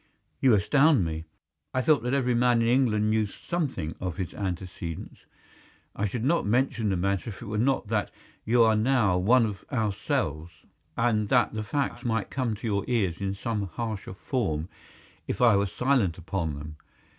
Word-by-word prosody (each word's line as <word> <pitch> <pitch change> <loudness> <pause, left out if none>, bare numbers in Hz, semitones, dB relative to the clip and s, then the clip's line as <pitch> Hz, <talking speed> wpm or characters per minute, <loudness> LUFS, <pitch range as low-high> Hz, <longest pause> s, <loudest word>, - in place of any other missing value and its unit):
"You 130 -4 +5
astound 135 - +4
me. 80 0 -4 0.5
I 130 - +1
thought 155 0 +4
that 125 +2 -2
every 125 -3 +1
man 120 -1 +3
in - - +1
England 115 -4 +2
knew 110 -1 +2
something 130 - -3
of 90 -2 -4
his 95 -3 -4
antecedents. 90 -3 -6 0.7
I 105 - 0
should 110 +3 -4
not 165 +6 +2
mention 115 0 +1
the 95 - 0
matter 100 +4 -1
if 105 - -8
it 120 - -9
were 105 0 -2
not 125 -2 +1
that 105 -2 0 0.3
you 115 +1 +4
are 110 -1 +4
now 110 -5 +2
one 115 +6 +4
of 100 -3 -5
ourselves, 85 - -2 0.3
and 110 -3 +1
that - - +3
the 110 - -2
facts 120 +3 -2
might 115 -4 -1
come 125 -5 -1
to 110 - -9
your 100 -2 0
ears 100 -9 0
in 100 0 -2
some 105 -1 -2
harsher 105 0 -5
form 95 - -2 0.6
if - - -3
I 120 -4 +6
were 100 0 +2
silent 115 -4 +1
upon 85 -3 -3
them. 75 +1 -8
105 Hz, 180 wpm, -27 LUFS, 95-120 Hz, 0.7 s, I